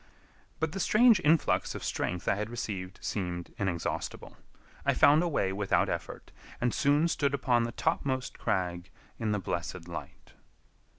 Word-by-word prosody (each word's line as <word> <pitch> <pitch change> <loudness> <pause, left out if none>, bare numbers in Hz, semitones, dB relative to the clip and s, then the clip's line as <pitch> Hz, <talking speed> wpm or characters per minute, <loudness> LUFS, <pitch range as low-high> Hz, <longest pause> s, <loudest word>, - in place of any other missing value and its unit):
But 160 -1 0
the 195 - -5
strange 225 +1 +5
influx 160 -1 +2
of - - -6
strength 90 -1 -2
I - - +4
had 105 +2 -3
received 100 -5 -5
seemed 90 -3 -3
inexhaustible. 90 -5 -3 0.5
I - - +2
found 145 +2 +6
a 175 - +1
way 95 - 0
without 100 0 +1
effort, - - -5 0.3
and 120 -1 +1
soon 145 +3 +3
stood 140 -4 +1
upon 120 -3 +2
the 115 - -4
topmost 130 +1 -1
crag 90 -1 -1 0.3
in 110 -2 0
the 105 - +1
blessed 85 -2 -4
light. 85 - -9
115 Hz, 155 wpm, -30 LUFS, 90-145 Hz, 0.5 s, found